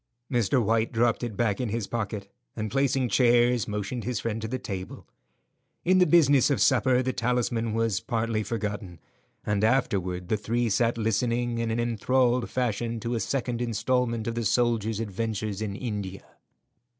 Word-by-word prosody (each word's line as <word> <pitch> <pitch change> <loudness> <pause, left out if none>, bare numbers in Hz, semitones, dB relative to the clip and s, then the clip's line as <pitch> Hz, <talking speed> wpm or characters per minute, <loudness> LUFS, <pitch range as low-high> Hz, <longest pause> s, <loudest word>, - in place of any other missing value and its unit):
Mr. 120 +1 +2
White 115 0 +1
dropped 120 -1 +1
it 115 -5 -4
back 110 -1 +1
in 125 - -2
his 110 0 -2
pocket, 105 -2 -4 0.3
and 110 -1 -3
placing 135 -1 +1
chairs, 120 -1 +3
motioned 105 +3 -3
his 125 0 -2
friend 115 -1 -3
to 110 - -3
the 130 +3 -2
table. 95 -6 -7 0.8
In 185 +2 +4
the 180 - +5
business 145 -5 +5
of 140 -6 +1
supper 130 +3 +3
the 130 0 -1
talisman 115 -2 0
was 115 -4 +1
partly 115 +2 -1
forgotten, 105 -5 -4 0.5
and 105 -1 0
afterward 95 -7 +1
the 110 - +2
three 115 +3 -1
sat 115 +3 +1
listening 115 +2 0
in 115 0 -1
an 115 +1 -1
enthralled 120 +1 +1
fashion 120 -2 -1
to 120 0 -2
a 115 - 0
second 120 -1 -2
instalment 115 0 0
of 115 - -2
the 115 0 -2
soldier's 115 -1 +1
adventures 110 -1 -3
in 105 -2 -3
India. 100 -5 -5
115 Hz, 165 wpm, -27 LUFS, 105-125 Hz, 0.8 s, the